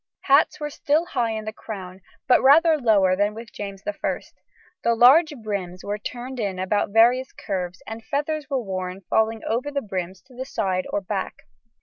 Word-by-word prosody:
Hats 280 +2 +3
were 295 -1 -4
still 310 +3 +1
high 245 -9 -1
in 220 -1 -5
the 215 - -5
crown, 190 -4 -8 0.3
but 250 - +5
rather 315 +4 +6
lower 210 -9 +3
than 205 +2 0
with 230 0 -9
James 200 -1 -7
I; 310 - -2 0.6
the 235 0 +3
large 280 +8 +6
brims 190 -4 -4
were 205 +1 -3
turned 250 +4 -6
about 195 -1 0
in 200 - -17
various 245 +3 +4
curves, 185 -1 -5
and 225 0 -7
feathers 300 +3 -2
were 265 -3 -1
worn 185 -1 -4
falling 220 0 +1
over 245 +6 -1
the 285 -1 -1
brims 185 -2 -5
to 260 - -20
the 255 +1 -5
side 185 -8 -2
or 205 - -1
back. 195 0 -4
220 Hz, 185 wpm, -24 LUFS, 195-265 Hz, 0.6 s, rather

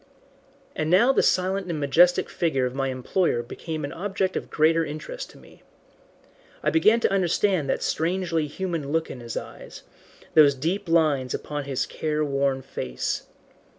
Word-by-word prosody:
And 155 - -1
now 220 +10 +5
the - - +3
silent 190 0 +1
and 160 -3 -2
majestic 165 +6 +4
figure 135 -7 0
of 125 - -3
my 135 0 -1
employer 130 +1 0
became 155 +5 -5
an 140 - -6
object 190 0 -2
of - - -4
greater 165 +2 +3
interest 155 - -6
to - - -16
me. - - -18 1.0
I - - +2
began 235 -8 +4
to - - +1
understand 185 -4 +1
that - - 0
strangely 165 -2 0
human 165 -3 -4
look 160 +1 0
in 125 - -8
his 120 -1 -6
eyes, - - -9 0.5
those 145 -3 +6
deep 170 +7 -2
lines 150 -6 +2
upon 145 -1 -5
his 135 -2 -1
care 155 -1 -2
worn 140 -1 0
face. 65 - -4
160 Hz, 160 wpm, -25 LUFS, 140-185 Hz, 1.0 s, those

